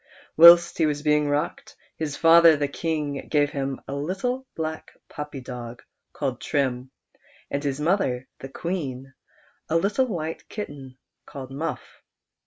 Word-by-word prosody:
Whilst 170 Hz, +2 st, +8 dB
he 160 Hz, -, +4 dB
was 145 Hz, -1 st, -2 dB
being 150 Hz, -1 st, +2 dB
rocked, 145 Hz, +1 st, -3 dB, 0.2 s
his 150 Hz, -3 st, -4 dB
father 165 Hz, -1 st, +7 dB
the 145 Hz, 0 st, 0 dB
Kinij 150 Hz, -2 st, -3 dB
gave 145 Hz, -1 st, +2 dB
him 135 Hz, -1 st, -3 dB
a -, -, -5 dB
little 195 Hz, -, -3 dB
black 160 Hz, -1 st, -4 dB, 0.2 s
puppy 150 Hz, -3 st, -7 dB
dof^ 120 Hz, -2 st, -8 dB, 0.3 s
called 130 Hz, -4 st, -3 dB
Trim, 130 Hz, -3 st, -1 dB, 0.6 s
and 140 Hz, +1 st, -2 dB
his 140 Hz, -1 st, -2 dB
mother 150 Hz, -7 st, 0 dB
the 135 Hz, -, -8 dB
Queen 135 Hz, -5 st, -5 dB, 0.6 s
a 160 Hz, -, 0 dB
little 210 Hz, +9 st, +1 dB
white 165 Hz, -7 st, -5 dB
kitten 140 Hz, -10 st, -8 dB, 0.3 s
called 135 Hz, -1 st, -9 dB
Muff. 150 Hz, +5 st, -6 dB
150 Hz, 140 wpm, -24 LUFS, 135-165 Hz, 0.6 s, Whilst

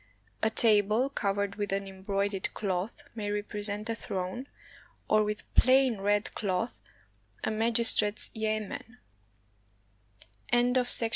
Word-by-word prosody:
A 220 Hz, -, +2 dB
table 220 Hz, +3 st, +3 dB
covered 200 Hz, -4 st, -2 dB
with 205 Hz, -2 st, -3 dB
an 195 Hz, 0 st, -2 dB
embroidered 195 Hz, 0 st, -2 dB
cloth 195 Hz, +7 st, -3 dB
may 210 Hz, -3 st, -4 dB
represent 205 Hz, +1 st, -2 dB
a 230 Hz, -, -1 dB
throne, 195 Hz, +4 st, -5 dB, 0.6 s
or 215 Hz, 0 st, +4 dB
with 210 Hz, 0 st, -3 dB
plain 255 Hz, -3 st, +4 dB
red 205 Hz, +1 st, 0 dB
cloth 205 Hz, +3 st, -3 dB, 0.6 s
a -, -, 0 dB
magistrate's 225 Hz, -1 st, +4 dB
yamen. 215 Hz, +2 st, -4 dB
210 Hz, 100 wpm, -29 LUFS, 200-225 Hz, 0.6 s, or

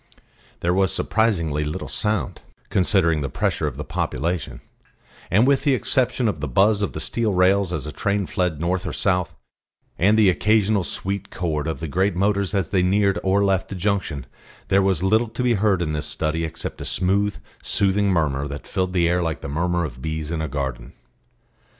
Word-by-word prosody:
There 85 Hz, +1 st, +1 dB
was 95 Hz, 0 st, +2 dB
surprisingly 85 Hz, -10 st, +1 dB
little 75 Hz, +1 st, -4 dB
sound, 105 Hz, -3 st, -2 dB, 0.3 s
considering 90 Hz, -5 st, +2 dB
the 70 Hz, -, -2 dB
pressure -, -, -1 dB
of -, -, -5 dB
the -, -, -4 dB
population; 85 Hz, -2 st, -3 dB, 0.7 s
and, 105 Hz, +7 st, +4 dB
with 140 Hz, 0 st, +3 dB
the 140 Hz, -3 st, +3 dB
exception 125 Hz, -1 st, +1 dB
of 90 Hz, -8 st, -1 dB
the 75 Hz, -, -3 dB
buzz 100 Hz, -, +3 dB
of 100 Hz, -, -1 dB
the -, -, -5 dB
steel 110 Hz, -4 st, -1 dB
rails 95 Hz, +1 st, +3 dB
as 75 Hz, -5 st, -3 dB
a 75 Hz, -, -5 dB
train 100 Hz, +3 st, -1 dB
fled 90 Hz, -5 st, -1 dB
north 90 Hz, +2 st, -1 dB
or -, -, -4 dB
south, 90 Hz, -4 st, 0 dB, 0.6 s
and 105 Hz, +5 st, +4 dB
the 110 Hz, -2 st, +5 dB
occasional 105 Hz, 0 st, +2 dB
sweet 100 Hz, +3 st, -4 dB
chord 80 Hz, -4 st, -2 dB
of 80 Hz, -, -3 dB
the 80 Hz, -, -3 dB
great 95 Hz, +6 st, 0 dB
motors 100 Hz, +1 st, +1 dB
as 95 Hz, -5 st, -1 dB
they 95 Hz, -3 st, +3 dB
neared 100 Hz, +1 st, +2 dB
or 100 Hz, +1 st, +2 dB
left 95 Hz, -1 st, +1 dB
the 100 Hz, -, -5 dB
junction, 95 Hz, -, -1 dB, 0.4 s
there 100 Hz, -, +4 dB
was 95 Hz, -3 st, +1 dB
little 110 Hz, +4 st, +2 dB
to 115 Hz, +3 st, -3 dB
be 125 Hz, -1 st, +3 dB
heard 100 Hz, -4 st, +2 dB
in 75 Hz, -2 st, -2 dB
this 75 Hz, 0 st, -2 dB
study 80 Hz, +2 st, -1 dB
except 80 Hz, 0 st, -6 dB
a -, -, -5 dB
smooth, 100 Hz, +2 st, 0 dB, 0.3 s
soothing 100 Hz, +1 st, +1 dB
murmur 75 Hz, -6 st, 0 dB
that 70 Hz, +1 st, -7 dB
filled 95 Hz, -2 st, -2 dB
the 85 Hz, -2 st, +3 dB
air 90 Hz, +1 st, +1 dB
like 80 Hz, -2 st, -2 dB
the -, -, -6 dB
murmur 85 Hz, +4 st, 0 dB
of 65 Hz, -4 st, -8 dB
bees 80 Hz, +1 st, -3 dB
in 80 Hz, -2 st, -2 dB
a 80 Hz, -, -2 dB
garden. 65 Hz, -4 st, -4 dB
90 Hz, 195 wpm, -22 LUFS, 80-100 Hz, 0.7 s, the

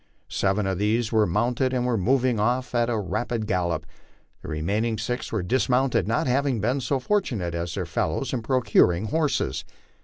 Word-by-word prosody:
Seven 95 Hz, +1 st, +1 dB
of 95 Hz, -1 st, -1 dB
these 110 Hz, +2 st, +1 dB
were 110 Hz, -2 st, +3 dB
mounted 120 Hz, +7 st, 0 dB
and 125 Hz, -1 st, 0 dB
were 125 Hz, -1 st, +1 dB
moving 125 Hz, +3 st, +2 dB
off 125 Hz, +4 st, 0 dB
at 120 Hz, -1 st, +2 dB
a 115 Hz, -, 0 dB
rapid 110 Hz, +4 st, -2 dB
gallop; 90 Hz, -5 st, -1 dB, 0.6 s
the -, -, -10 dB
remaining 100 Hz, +9 st, -1 dB
six 120 Hz, +4 st, -3 dB
were 105 Hz, -5 st, -1 dB
dismounted, 125 Hz, -1 st, +1 dB
not 115 Hz, -, +1 dB
having 130 Hz, -1 st, +1 dB
been 125 Hz, +7 st, 0 dB
so 130 Hz, +3 st, 0 dB
fortunate 125 Hz, -, -1 dB
as 85 Hz, 0 st, -3 dB
their -, -, -2 dB
fellows -, -, -2 dB
in 125 Hz, -, -1 dB
procuring 110 Hz, -5 st, +2 dB
horses. 150 Hz, -, 0 dB
115 Hz, 175 wpm, -25 LUFS, 95-125 Hz, 0.6 s, were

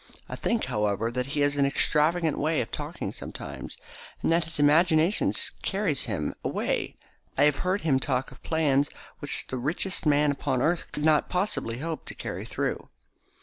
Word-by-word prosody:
I -, -, -5 dB
think, 235 Hz, -1 st, 0 dB
however, 105 Hz, +2 st, 0 dB
that 125 Hz, +1 st, -2 dB
he 145 Hz, +1 st, -1 dB
has 145 Hz, 0 st, +2 dB
an 140 Hz, -, +4 dB
extravagant 155 Hz, +3 st, +2 dB
way 155 Hz, +1 st, +1 dB
of 115 Hz, -, -3 dB
talking -, -, -4 dB
sometimes, -, -, -8 dB, 0.5 s
and -, -, +2 dB
that 165 Hz, -1 st, +3 dB
his 165 Hz, -, -5 dB
imagination 160 Hz, +5 st, +4 dB, 0.3 s
carries 190 Hz, -8 st, 0 dB
him 95 Hz, -10 st, -2 dB
away. -, -, -1 dB, 0.4 s
I 140 Hz, -, +5 dB
have 150 Hz, -1 st, +4 dB
heard 185 Hz, +3 st, 0 dB
him 140 Hz, -5 st, +2 dB
talk 130 Hz, -1 st, -1 dB
of 135 Hz, -, -15 dB
plans 145 Hz, -3 st, +2 dB, 0.3 s
which -, -, -1 dB
the 130 Hz, -, -4 dB
richest 155 Hz, +6 st, -1 dB
man 145 Hz, 0 st, +4 dB
upon 140 Hz, -2 st, -1 dB
earth 165 Hz, +6 st, +1 dB
could 150 Hz, -, -3 dB
not 155 Hz, -1 st, +4 dB
possibly 180 Hz, -, -1 dB
hope 160 Hz, +3 st, -4 dB
to -, -, -8 dB
carry -, -, -5 dB
through." -, -, -3 dB
150 Hz, 175 wpm, -27 LUFS, 135-165 Hz, 0.5 s, I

